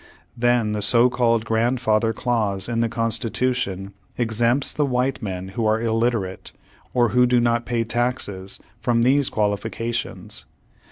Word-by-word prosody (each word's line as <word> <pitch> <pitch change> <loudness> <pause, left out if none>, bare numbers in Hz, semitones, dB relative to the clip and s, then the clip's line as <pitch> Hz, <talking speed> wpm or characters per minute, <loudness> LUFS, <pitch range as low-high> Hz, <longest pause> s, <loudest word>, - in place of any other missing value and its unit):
Then 120 -2 +2
the 105 0 -2
so 120 +4 +4
called 115 -2 +1
grand 115 +3 +1
father 110 -1 +2
clause 110 -5 0
in 115 -1 -1
the 115 0 +1
Constitution 115 -3 -1 0.2
exempts 120 +3 +2
the 150 - 0
white 130 0 0
men 95 -3 -5
who 110 +3 -1
are 110 +1 +2
illiterate, 115 -4 -1 0.4
or 120 -2 +2
who 125 +3 +4
do 125 0 +3
not 120 0 +1
pay 120 -2 0
taxes, 115 -5 -2 0.2
from 115 -1 +1
these 135 +2 +3
qualifications. 110 +3 -2
115 Hz, 145 wpm, -22 LUFS, 110-125 Hz, 0.4 s, so